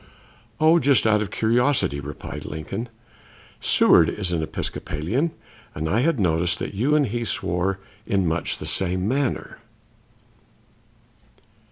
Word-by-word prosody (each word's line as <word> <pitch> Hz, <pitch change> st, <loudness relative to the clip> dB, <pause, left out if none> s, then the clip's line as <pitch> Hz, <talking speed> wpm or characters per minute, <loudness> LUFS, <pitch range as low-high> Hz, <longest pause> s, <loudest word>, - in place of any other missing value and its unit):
"Oh, 160 Hz, +2 st, +5 dB
just 140 Hz, -6 st, +3 dB
out 105 Hz, -1 st, +3 dB
of 105 Hz, -, -3 dB
curiosity," 120 Hz, -, +1 dB
replied 70 Hz, 0 st, -7 dB
Lincoln. 80 Hz, +10 st, -5 dB, 0.7 s
"Seward 85 Hz, -1 st, +5 dB
is 95 Hz, -4 st, -2 dB
an 85 Hz, -2 st, 0 dB
Episcopalian, 85 Hz, -, -2 dB, 0.5 s
and 80 Hz, +2 st, -3 dB
I 105 Hz, +8 st, +1 dB
had 150 Hz, 0 st, +1 dB
noticed 85 Hz, -1 st, +1 dB
that -, -, -5 dB
you 130 Hz, +10 st, +1 dB
and 150 Hz, -2 st, +3 dB
he 120 Hz, +1 st, -3 dB
swore 95 Hz, -2 st, -1 dB, 0.3 s
in 95 Hz, -2 st, +1 dB
much 80 Hz, 0 st, -1 dB
the -, -, -7 dB
same 95 Hz, 0 st, -1 dB
manner." 135 Hz, +2 st, -2 dB
100 Hz, 130 wpm, -23 LUFS, 85-125 Hz, 0.7 s, Oh